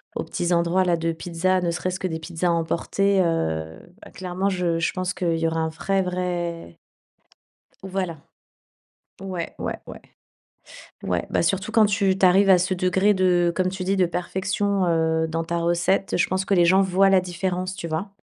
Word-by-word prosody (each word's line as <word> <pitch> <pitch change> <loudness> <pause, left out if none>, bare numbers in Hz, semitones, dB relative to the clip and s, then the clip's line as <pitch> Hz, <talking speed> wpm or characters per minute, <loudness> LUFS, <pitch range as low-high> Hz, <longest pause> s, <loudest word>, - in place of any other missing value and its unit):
aux - - -2
petits 175 0 -2
endroits, 170 +2 +2
là, 175 -1 +2
de 165 0 -1
pizzas. 175 +3 -1
Ne 170 -1 0
serait-ce 185 +2 -3
que 185 - -2
des 160 -2 -4
pizzas 170 +2 -3
à - - +3
emporter, 185 +4 +1
heu. 80 - -1 0.2
Bah, - - -13
clairement, 185 +1 -2
je 175 -3 -1
je 165 - 0
pense 185 0 -2
qu'il 170 -3 -1
y 165 - +1
aura 165 0 -1
un 160 - -1
vrai 195 +4 -1
vrai 175 - -3 1.1
voilà. 185 -4 -3 1.0
Ouais, 185 -3 -5
ouais, - - -4
ouais. - - -10 1.0
Ouais, - - -2
bah, - - +1
surtout 195 +4 -1
quand 220 -2 +6
tu 195 -2 +1
tu 190 - +4
arrives 195 +2 +5
à 185 - +8
ce 185 +2 0
degré 185 +3 +2
de 180 -2 +2
comme 185 -1 +1
tu 190 0 -5
dis, 195 +1 0
de 185 - +4
perfection, 190 +2 -1
heu, 160 -1 +1
dans 165 +1 -2
ta 170 +1 -3
recette, 175 +3 +1
je 180 - +2
pense 190 +1 -1
que 200 - 0
les 175 -2 +5
gens 190 +3 +5
voient 195 +1 +3
la 190 -1 +5
différence, 185 +1 -3
tu 170 - -6
vois? 165 +6 -4
180 Hz, 195 wpm, -23 LUFS, 170-190 Hz, 1.1 s, à